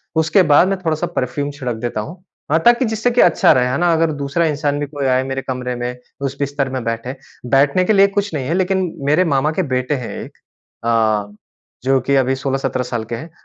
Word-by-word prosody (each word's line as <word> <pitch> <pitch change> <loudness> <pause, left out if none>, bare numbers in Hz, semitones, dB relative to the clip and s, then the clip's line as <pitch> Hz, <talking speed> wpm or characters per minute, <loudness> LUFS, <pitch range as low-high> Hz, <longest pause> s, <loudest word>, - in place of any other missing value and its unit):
उसके 160 +4 +3
बाद 155 +5 +6
मैं 195 0 0
थोड़ा-सा 155 -1 0
परफ्यूम 140 +3 -2
छिड़क 130 -4 -4
देता 110 -1 -3
हूँ। 170 - -10 0.3
हाँ 160 - +4
ताकि 240 +2 +5
जिससे 220 +2 0
कि 245 - +3
अच्छा 175 - +5
रहे 125 -1 +2
है 125 - -1
ना? 175 0 +2
अगर 165 0 +2
दूसरा 145 +3 -1
इंसान 145 -2 -1
भी 145 - -1
कोई 140 -1 -4
आए 130 0 +2
मेरे 135 0 -3
कमरे 125 -1 -4
में 120 +1 -4 0.3
उस 140 0 -3
बिस्तर 140 -1 -1
में 130 -2 -4
बैठे, 115 +3 -3 0.3
बैठने 140 +7 +3
के 215 - +3
लिए 200 -1 +6
कुछ 200 -1 -2
नहीं 140 -4 -2
है 165 - 0
लेकिन 185 -1 0 0.2
मेरे 155 +5 +4
मामा 145 -1 +1
के 190 - +2
बेटे 125 +3 0
हैं 125 -3 -5
एक। - - -13 0.5
अ, 110 -3 +1 0.5
जो 135 0 +3
कि 140 +2 0
अभी 130 0 +2
16-17 135 -1 -2
साल 120 -2 -3
के 115 - -6
हैं। 140 +9 -7
140 Hz, 225 wpm, -18 LUFS, 125-165 Hz, 0.5 s, बाद